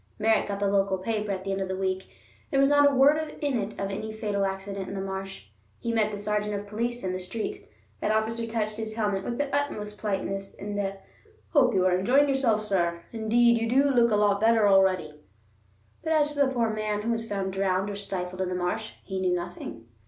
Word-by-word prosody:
Merritt 220 Hz, 0 st, +2 dB
got 200 Hz, -1 st, -3 dB
the 200 Hz, -, +1 dB
local 195 Hz, -1 st, +2 dB
paper 210 Hz, +1 st, -2 dB
at 190 Hz, -1 st, -3 dB
the 195 Hz, -, -3 dB
end 195 Hz, 0 st, -1 dB
of 190 Hz, -, -1 dB
the 190 Hz, 0 st, -3 dB
week; 190 Hz, 0 st, -2 dB, 0.4 s
there 275 Hz, -, +1 dB
was 275 Hz, 0 st, +5 dB
not 290 Hz, 0 st, +6 dB
a -, -, -1 dB
word 300 Hz, +3 st, +4 dB
in 280 Hz, -5 st, 0 dB
it 205 Hz, +2 st, -5 dB
of 195 Hz, 0 st, -4 dB
any 215 Hz, +2 st, -4 dB
fatal 210 Hz, -2 st, -1 dB
accident 195 Hz, 0 st, -5 dB
in 200 Hz, -, -5 dB
the -, -, -3 dB
marsh. 190 Hz, -, -6 dB, 0.3 s
He 235 Hz, -, -2 dB
met 220 Hz, -2 st, +2 dB
the 205 Hz, -, -5 dB
sergeant 210 Hz, 0 st, -1 dB
of 200 Hz, 0 st, -4 dB
police 235 Hz, +4 st, -3 dB
in 185 Hz, -1 st, -1 dB
the 185 Hz, -, -3 dB
street. 390 Hz, -, -4 dB, 0.3 s
That -, -, -1 dB
officer 220 Hz, +2 st, 0 dB
touched 215 Hz, -2 st, -2 dB
his 220 Hz, -1 st, -5 dB
helmet 205 Hz, -3 st, 0 dB
with 235 Hz, +3 st, -3 dB
the 285 Hz, -1 st, -1 dB
utmost 210 Hz, -8 st, -2 dB
politeness 195 Hz, -1 st, -3 dB
and 205 Hz, 0 st, -5 dB
a 195 Hz, -1 st, -2 dB, 0.5 s
"hope 255 Hz, -, +4 dB
you 185 Hz, -1 st, +3 dB
are 180 Hz, -1 st, +4 dB
enjoying 255 Hz, +10 st, +4 dB
yourself, 250 Hz, -6 st, +2 dB
sir; 170 Hz, -4 st, 0 dB
indeed 235 Hz, +1 st, +3 dB
you 230 Hz, -, 0 dB
do 275 Hz, +3 st, +4 dB
look 240 Hz, -2 st, +4 dB
a 215 Hz, -, +2 dB
lot 205 Hz, -1 st, +3 dB
better 225 Hz, -1 st, +5 dB
already"; 185 Hz, -6 st, +3 dB, 0.8 s
but 320 Hz, -, +1 dB
as 295 Hz, -1 st, +2 dB
to 290 Hz, -, -6 dB
the 280 Hz, -, +5 dB
poor 235 Hz, -3 st, +1 dB
man 215 Hz, -1 st, -2 dB
who 230 Hz, -, 0 dB
was 230 Hz, 0 st, -2 dB
found 195 Hz, -2 st, -2 dB
drowned 190 Hz, 0 st, +1 dB
or 205 Hz, -, -4 dB
stifled 185 Hz, -2 st, -4 dB
in 185 Hz, -, -1 dB
the 180 Hz, -, -2 dB
marsh, 180 Hz, +5 st, -2 dB
he 190 Hz, -1 st, -4 dB
knew 180 Hz, -1 st, +2 dB
nothing. 175 Hz, -9 st, -6 dB
210 Hz, 230 wpm, -27 LUFS, 195-230 Hz, 0.8 s, not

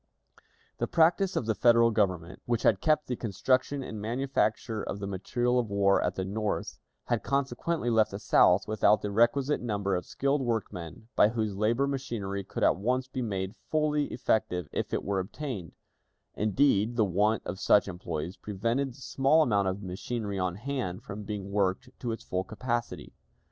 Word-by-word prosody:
The -, -, 0 dB
practice 175 Hz, +3 st, +3 dB
of -, -, 0 dB
the 110 Hz, -, +1 dB
Federal 115 Hz, +1 st, +5 dB
Government, 95 Hz, -5 st, -1 dB
which 120 Hz, -2 st, 0 dB
had 95 Hz, -4 st, +3 dB
kept 155 Hz, -1 st, +2 dB
the 125 Hz, -, -2 dB
construction 130 Hz, +6 st, 0 dB
and 110 Hz, -4 st, -6 dB
manufacture 115 Hz, -2 st, -1 dB
of -, -, -4 dB
the 100 Hz, -, -5 dB
material 120 Hz, +6 st, 0 dB
of 115 Hz, -3 st, -2 dB
war 100 Hz, -1 st, +3 dB
at 90 Hz, -, -1 dB
the 95 Hz, -, -2 dB
North, 105 Hz, +2 st, -3 dB, 0.2 s
had -, -, -1 dB
consequently 140 Hz, +1 st, -1 dB
left 110 Hz, -1 st, +4 dB
the 100 Hz, -, -5 dB
South 95 Hz, -1 st, +4 dB
without 105 Hz, -1 st, +3 dB
the 105 Hz, -, -2 dB
requisite 130 Hz, +7 st, +2 dB
number 100 Hz, -5 st, -1 dB
of 90 Hz, -, -4 dB
skilled 140 Hz, +1 st, 0 dB
workmen 110 Hz, -5 st, -4 dB
by 105 Hz, -, +6 dB
whose 110 Hz, -3 st, -2 dB
labor 115 Hz, +6 st, +2 dB
machinery 115 Hz, -8 st, -3 dB
could -, -, -4 dB
at -, -, +4 dB
once 125 Hz, +6 st, 0 dB
be 130 Hz, 0 st, -4 dB
made 95 Hz, -4 st, -3 dB, 0.2 s
fully 150 Hz, -1 st, +1 dB
effective 90 Hz, -, -1 dB
if -, -, -3 dB
it -, -, -1 dB
were 100 Hz, -1 st, -1 dB
obtained; 100 Hz, -, -5 dB, 0.6 s
indeed, 110 Hz, 0 st, +2 dB
the 110 Hz, -3 st, +3 dB
want 105 Hz, +4 st, +1 dB
of 95 Hz, +2 st, -5 dB
such 105 Hz, -, +4 dB
employees 85 Hz, -2 st, -5 dB
prevented 115 Hz, +6 st, -2 dB
the 130 Hz, -, -16 dB
small 135 Hz, +5 st, +3 dB
amount 100 Hz, -7 st, +2 dB
of 95 Hz, +2 st, -3 dB
machinery 100 Hz, +2 st, -4 dB
on 90 Hz, -1 st, -1 dB
hand 115 Hz, -4 st, -4 dB
from 105 Hz, +1 st, -7 dB
being 100 Hz, -1 st, -5 dB
worked 100 Hz, +4 st, 0 dB
to 120 Hz, -, -3 dB
its 115 Hz, -, -5 dB
full 90 Hz, 0 st, -2 dB
capacity. 120 Hz, +4 st, -4 dB
110 Hz, 175 wpm, -29 LUFS, 100-125 Hz, 0.6 s, by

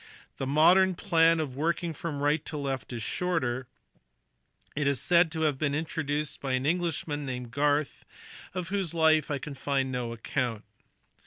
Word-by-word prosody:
The 135 Hz, -, -3 dB
modern 180 Hz, +6 st, +5 dB
plan 165 Hz, -1 st, +3 dB
of 140 Hz, -5 st, -3 dB
working 165 Hz, +3 st, -1 dB
from 145 Hz, -2 st, -4 dB
right 150 Hz, +1 st, +2 dB
to 155 Hz, -, -4 dB
left 135 Hz, -5 st, -3 dB
is 115 Hz, -3 st, -4 dB
shorter: 130 Hz, -9 st, -1 dB, 1.1 s
it 145 Hz, -1 st, 0 dB
is 140 Hz, -3 st, +2 dB
said 170 Hz, -2 st, +4 dB
to 160 Hz, -, -3 dB
have 150 Hz, -4 st, +1 dB
been 145 Hz, -2 st, 0 dB
introduced 150 Hz, -2 st, -2 dB
by 135 Hz, -2 st, -2 dB
an 130 Hz, +1 st, 0 dB
Englishman 160 Hz, -3 st, -1 dB
named 125 Hz, -3 st, -5 dB
Garth, 145 Hz, +2 st, 0 dB, 0.5 s
of 180 Hz, -1 st, -3 dB
whose 190 Hz, -4 st, -2 dB
life 160 Hz, -1 st, +4 dB
I 145 Hz, -, 0 dB
can 140 Hz, +2 st, -7 dB
find 135 Hz, -1 st, -1 dB
no 125 Hz, -2 st, -3 dB
account. 115 Hz, -1 st, -2 dB
145 Hz, 165 wpm, -28 LUFS, 135-165 Hz, 1.1 s, modern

